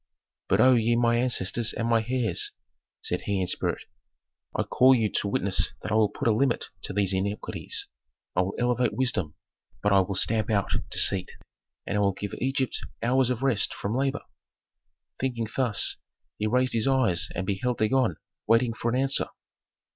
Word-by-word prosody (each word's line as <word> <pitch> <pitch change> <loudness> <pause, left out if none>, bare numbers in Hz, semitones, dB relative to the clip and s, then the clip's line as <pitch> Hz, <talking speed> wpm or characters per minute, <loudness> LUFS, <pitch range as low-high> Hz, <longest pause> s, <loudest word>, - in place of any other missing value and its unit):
"But - - +3
O 130 0 +6
ye 115 0 +2
my 120 0 +2
ancestors 120 -2 0
and 115 - -2
my 115 -1 +2
heirs," 120 -8 0 0.5
said - - -2
he 100 -1 -2
in 95 - 0
spirit, - - -2 0.7
"I - - +1
call 130 +1 +4
you 110 -4 0
to - - 0
witness 100 -1 +1
that - - -5
I - - +1
will 110 -1 +3
put - - -4
a - - +5
limit 120 +3 0 0.2
to - - -4
these 100 -1 +1
iniquities; 100 +2 -2 0.5
I 90 - +3
will 95 +2 -3
elevate 125 0 0
wisdom, 105 - -1 0.5
but 105 -1 +3
I 100 - +6
will 95 +1 -1
stamp 110 +2 +3
out 100 -3 0 0.2
deceit, 95 -2 +3 0.5
and 105 - -1
I - - +2
will 100 -1 +2
give 100 +1 -6
Egypt 135 0 -1 0.2
hours 130 +1 +2
of 125 0 -2
rest 130 -6 +2
from 105 +3 -3
labor." 135 +2 -1 1.0
Thinking 120 -4 -2
thus, 125 -6 +1 0.4
he 105 - 0
raised 125 +3 +1
his 115 +1 0
eyes 130 -10 +2
and 95 - -2
beheld 105 +6 -2
Dagon 110 -4 +1 0.3
waiting 115 +1 +3
for 115 +1 -3
an 125 +2 0
answer. 135 0 +4
115 Hz, 175 wpm, -26 LUFS, 100-125 Hz, 1.0 s, O